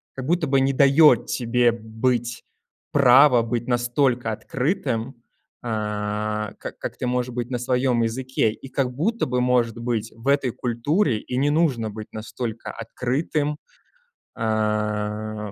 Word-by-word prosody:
как 130 - -5
будто 170 -1 +1
бы 135 0 +3
не 135 +1 +2
даёт 140 -1 +5
тебе 120 0 +2
быть, 115 +1 -2 0.5
право 130 -1 +6
быть 115 +1 -3
настолько 120 -1 +1
открытым, 130 - -2 0.5
а, 105 -1 -2
как - - -7
как - - -6
ты 125 - -3
можешь 125 0 -1
быть 120 0 -3
на 125 - -1
своём 125 -1 +1
языке, 120 0 0
и 135 - -11
как 130 -2 -1
будто 220 - 0
бы, 125 0 0
может 125 -3 +1
быть, 115 -2 -2
в 115 +3 -10
этой 140 -2 +2
культуре 125 - 0
и 125 - -5
не 145 +2 +2
нужно 145 -8 +1
быть 105 0 -8
настолько 115 +1 -6
открытым, 145 +6 -2 0.8
а, 105 -1 -2
120 Hz, 140 wpm, -23 LUFS, 110-135 Hz, 0.8 s, право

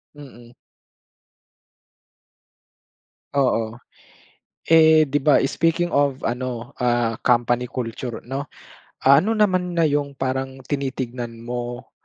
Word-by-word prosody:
Mm. 120 -5 -14 2.8
Oo. 115 -5 +1 0.9
Eh, 160 -1 +6
di 145 - 0
ba 150 -1 +5
speaking 165 +4 0
of 140 -1 +1
ano, 120 -1 -4
ah, 120 -2 +1
company 120 0 +2
culture 120 -1 -5
'no, 135 +3 -4 0.6
ah, 140 +1 +7
ano 225 +5 0
naman 185 -4 +1
na 165 - +3
yung 145 -1 0
parang 130 0 -3
tinitignan 125 -4 -4
mo 120 0 -5
130 Hz, 100 wpm, -22 LUFS, 120-145 Hz, 2.8 s, ah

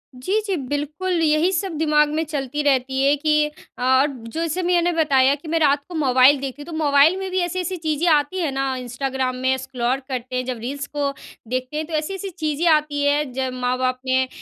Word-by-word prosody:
जी, 370 +13 0
जी। 390 -3 -1
बिल्कुल, 300 +6 -3
यही 310 +3 +3
सब 375 0 -2
दिमाग़ 300 -1 +3
में 310 +2 -1
चलती 295 -1 -3
रहती 265 -1 +1
है 280 +1 +4
कि 300 +1 +2 0.3
अ - - -3 0.2
और 285 - +3 0.2
जैसे 330 +2 -2
मैंने 350 0 +2
बताया 280 -4 +3
कि 300 +3 -13
मैं 330 +1 0
रात 285 -2 +3
को 350 - -7
मोबाइल 265 -1 +5
देखती 275 +1 -6
हूँ। 290 - -8
तो 335 - -8
मोबाइल 295 +2 +4
में 385 0 -4
भी 375 - 0
ऐसी-ऐसी 360 +1 -2
चीज़ें 315 +1 -1
आती 295 +5 +1
हैं 320 -5 0
ना 270 0 -1
इंस्टाग्राम 255 +1 -3
में 260 +1 +1
स्क्रॉल 260 -1 -2
करते 255 -1 -4
हैं, 255 - 0
जब 255 -1 -3
रील्स 280 +5 -5
को 285 -1 0 0.4
देखते 255 +4 -3
हैं 315 - -2
तो 325 - -9
ऐसी-ऐसी 380 +6 -3
चीज़ें 315 -1 -2
आती 300 -2 +1
हैं, 285 -1 +1
जब 260 0 -2
माँ-बाप 255 0 -1
ने 260 0 +2
290 Hz, 210 wpm, -22 LUFS, 260-320 Hz, 0.4 s, मोबाइल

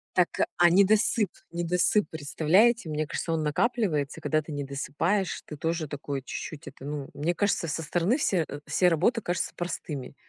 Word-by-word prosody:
Так, 180 -2 +4 0.3
а 175 0 +6
недосып, 200 +2 +4 0.2
недосып, 175 +4 +1
представляете, 165 +8 +2
мне 155 0 -1
кажется, 165 - -3
он 160 -1 0
накапливается, 155 - 0
когда 155 0 +1
ты 155 - -10
недосыпаешь, 145 +7 -1
ты 150 - -8
тоже 165 +1 -2
такой 140 -1 -4
чуть-чуть, 155 +2 -7
это, - - -11
ну 145 -2 -5
мне 170 +4 -1
кажется, 200 -3 +1
со 160 +1 -2
стороны 175 - +1
все 190 - +1
э, 145 - -7
все 165 +4 +2
работы 180 +8 +2
кажутся 175 0 -2
простыми 155 -6 -5
165 Hz, 165 wpm, -27 LUFS, 150-185 Hz, 0.3 s, а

